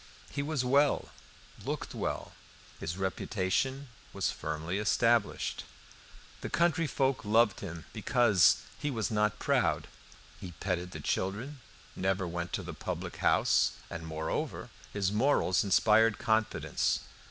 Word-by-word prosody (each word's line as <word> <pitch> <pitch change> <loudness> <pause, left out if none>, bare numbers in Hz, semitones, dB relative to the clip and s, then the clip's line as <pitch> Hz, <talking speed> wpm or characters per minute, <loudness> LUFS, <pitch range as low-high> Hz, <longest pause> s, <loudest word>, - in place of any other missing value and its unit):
He 140 - -2
was 140 -3 -1
well, 140 +3 +3 0.5
looked - - -4
well; - - -3 0.5
his 85 - -4
reputation 95 +8 -1 0.3
was 95 -5 0
firmly 80 +5 -3
established. 115 +1 +1 0.8
The - - -4
country 165 -1 +2
folk 135 -4 0
loved 110 0 +3
him 85 -4 -7
because 110 -3 +4 0.2
he 145 - -1
was 115 -7 -2
not 105 -1 +1
proud. - - +1 0.5
He 90 -2 -8
petted 90 -2 -2
the - - -8
children, 115 +10 -2 0.4
never 95 0 0
went 85 0 -4
to - - -2
the - - -6
public - - -5
house, - - +3 0.2
and, 80 0 -6
moreover, 80 0 -3 0.2
his 100 -2 0
morals 110 -4 +3
inspired 105 +2 +4
confidence. 110 0 0
105 Hz, 125 wpm, -31 LUFS, 95-125 Hz, 0.8 s, because